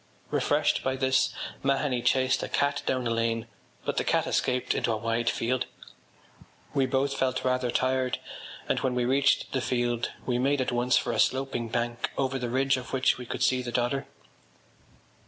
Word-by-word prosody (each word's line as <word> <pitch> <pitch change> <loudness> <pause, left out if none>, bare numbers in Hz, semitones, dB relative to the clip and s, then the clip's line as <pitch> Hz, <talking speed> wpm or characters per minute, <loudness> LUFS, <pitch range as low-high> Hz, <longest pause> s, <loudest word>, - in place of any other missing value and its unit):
Refreshed - - +2
by 130 0 0
this, 130 -1 +2 0.3
Mahony 135 -2 +1
chased 130 +1 +2
a - - -4
cat 140 0 +1
down 130 -1 0
a 115 - 0
lane, 115 0 0 0.4
but - - -2
the - - +2
cat - - +1
escaped 125 0 0
into - - 0
a 110 - 0
wide 115 +1 0
field. 125 +2 -1 1.1
We 135 -1 +2
both 135 +2 +1
felt 130 -1 0
rather 125 -1 +1
tired 130 +1 +1 0.5
and - - +1
when 130 -2 -1
we 125 -1 +1
reached 135 +2 +2
the 130 - 0
field 120 -2 0 0.2
we 125 -1 0
made 140 +2 +2
at 130 - 0
once 120 +1 +2
for - - 0
a - - -1
sloping 130 -3 +1
bank 120 0 -1
over 135 -1 0
the 120 -1 -3
ridge 135 +2 +2
of 125 -2 -8
which 130 -1 +2
we 125 - -7
could - - -2
see 130 -1 +3
the 120 -1 -5
Dodder. 125 +3 0
130 Hz, 185 wpm, -28 LUFS, 120-130 Hz, 1.1 s, see